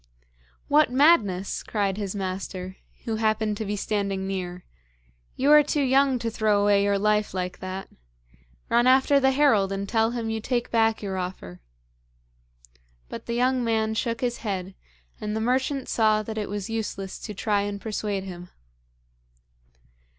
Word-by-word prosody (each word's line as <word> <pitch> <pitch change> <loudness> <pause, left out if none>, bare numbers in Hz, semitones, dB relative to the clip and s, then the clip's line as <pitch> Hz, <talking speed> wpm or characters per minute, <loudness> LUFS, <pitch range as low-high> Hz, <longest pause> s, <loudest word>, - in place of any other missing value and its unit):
'What 295 -3 +4
madness!' 240 - +3
cried 200 -3 -1
his 200 -1 -4
master, 185 -1 -5 0.3
who 225 -2 -2
happened 215 -1 0
to 220 - -4
be 205 +1 -2
standing 200 -2 -2
near. 180 -2 -5 0.7
'You 275 +3 +2
are 300 0 +9
too 295 0 0
young 270 0 +3
to 230 -1 -3
throw 215 -2 +2
away 205 0 +3
your 200 0 +2
life 210 0 +1
like 180 -1 -3
that. 185 +1 -6 0.8
Run 240 +1 +3
after 265 +2 +5
the 265 -1 +3
herald 260 -8 +3
and 195 0 -3
tell 225 +1 +2
him 230 -2 -3
you 220 0 -3
take 240 +1 -2
back 225 -1 +2
your 190 -2 -3
offer.' 180 - -6 1.5
But - - -8
the 235 - -2
young 255 +1 +2
man 220 -1 0
shook 230 +1 -2
his 240 -1 -1
head, 190 -3 -4 0.5
and 210 0 -3
the - - -1
merchant 260 +3 0
saw 215 -1 +2
that 220 +1 -5
it 210 - -4
was 205 -1 -4
useless 210 -4 -4
to 210 - -7
try 205 +1 0
and 200 0 -4
persuade 205 -2 -3
him. 180 -2 -9
215 Hz, 160 wpm, -25 LUFS, 195-240 Hz, 1.5 s, are